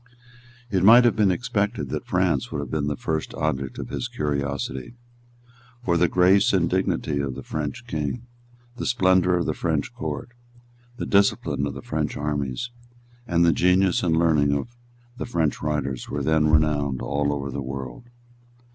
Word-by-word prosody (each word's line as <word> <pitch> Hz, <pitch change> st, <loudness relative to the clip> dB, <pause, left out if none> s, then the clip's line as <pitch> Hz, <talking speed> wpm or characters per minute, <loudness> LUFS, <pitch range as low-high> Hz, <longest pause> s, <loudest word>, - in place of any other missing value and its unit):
It 95 Hz, -3 st, +1 dB
might 120 Hz, +4 st, +8 dB
have 120 Hz, -, +3 dB
been 105 Hz, -3 st, +3 dB
expected 100 Hz, +1 st, -1 dB
that -, -, -4 dB
France 90 Hz, -7 st, +1 dB
would -, -, -3 dB
have 70 Hz, -3 st, -5 dB
been 75 Hz, -2 st, -1 dB
the 75 Hz, -, -1 dB
first 80 Hz, +2 st, -3 dB
object 70 Hz, -4 st, -2 dB
of -, -, -6 dB
his -, -, -3 dB
curiosity. 70 Hz, -, -3 dB, 0.9 s
For 85 Hz, -, +2 dB
the 85 Hz, +1 st, +4 dB
grace 95 Hz, +4 st, +4 dB
and 90 Hz, -3 st, +3 dB
dignity 85 Hz, -5 st, 0 dB
of 70 Hz, -2 st, -2 dB
the -, -, -7 dB
French 80 Hz, +11 st, -4 dB
King, 80 Hz, -, -3 dB, 0.5 s
the -, -, -3 dB
splendour 95 Hz, -6 st, +3 dB
of 85 Hz, -, -1 dB
the -, -, 0 dB
French -, -, -2 dB
Court, -, -, -5 dB, 0.7 s
the -, -, -3 dB
discipline 100 Hz, -8 st, +2 dB
of 70 Hz, -, -6 dB
the 70 Hz, -, -8 dB
French -, -, -2 dB
armies, 75 Hz, -, -3 dB, 0.6 s
and 85 Hz, -2 st, +3 dB
the 85 Hz, -, +4 dB
genius 90 Hz, 0 st, +3 dB
and 80 Hz, -2 st, +1 dB
learning 80 Hz, -4 st, +3 dB
of 120 Hz, +12 st, -4 dB, 0.4 s
the -, -, -4 dB
French 80 Hz, -10 st, 0 dB
writers, 75 Hz, -4 st, -2 dB
were 70 Hz, 0 st, -3 dB
then 80 Hz, +1 st, +3 dB
renowned 75 Hz, -4 st, +2 dB
all 70 Hz, +1 st, 0 dB
over 70 Hz, -1 st, -3 dB
the 70 Hz, -, -4 dB
world. 65 Hz, -, -6 dB
80 Hz, 170 wpm, -24 LUFS, 70-95 Hz, 0.9 s, might